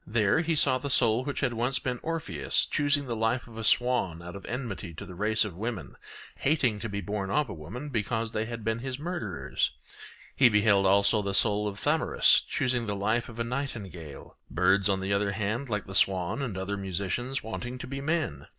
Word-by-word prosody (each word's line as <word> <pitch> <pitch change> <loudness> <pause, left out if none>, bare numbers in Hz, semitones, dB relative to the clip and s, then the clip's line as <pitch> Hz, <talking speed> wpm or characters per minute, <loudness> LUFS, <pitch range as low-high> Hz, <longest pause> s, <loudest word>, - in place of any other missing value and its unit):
There 105 +2 +2
he 165 -1 0
saw 130 -3 +5
the 140 - -4
soul 120 -2 +3
which 145 +1 -3
had 120 - +1
once 125 +3 0
been 125 -2 -3
Orpheus 150 - -1
choosing 145 0 +1
the 120 -3 -3
life 115 +3 0
of 115 - -13
a 115 - -5
swan 110 -8 +2
out 90 +2 -8
of 100 - -9
enmity 105 - -5
to - - -7
the 90 - -10
race 105 +4 +1
of 100 -5 -6
women, 110 +1 -5 0.4
hating 135 -7 +1
to 115 - -4
be 100 0 -3
born 100 +1 -3
of 145 +3 +1
a - - -5
woman 100 - -7
because 115 -1 -1
they 110 -1 -1
had 115 -1 -6
been 110 +1 -1
his 130 +1 -4
murderers; 175 +4 -2 0.7
he 130 -3 +6
beheld 105 -2 +4
also 100 +2 +4
the 100 -1 -2
soul 105 -1 +3
of 100 -1 -5
Thamyras - - +4
choosing 125 -3 0
the 105 - -1
life 110 +5 0
of 115 - -11
a 115 - 0
nightingale; 105 - -6
birds, 95 +3 +3
on 95 -1 +1
the 95 +1 -1
other 100 0 +1
hand, 110 +6 -2
like 105 -2 -2
the 95 - -9
swan 95 +5 +2
and 115 -8 -3
other 100 +2 -3
musicians, 100 +7 -3
wanting 120 +3 -5
to - - -7
be 135 +1 -5
men. 140 - -2
110 Hz, 210 wpm, -28 LUFS, 100-125 Hz, 0.7 s, he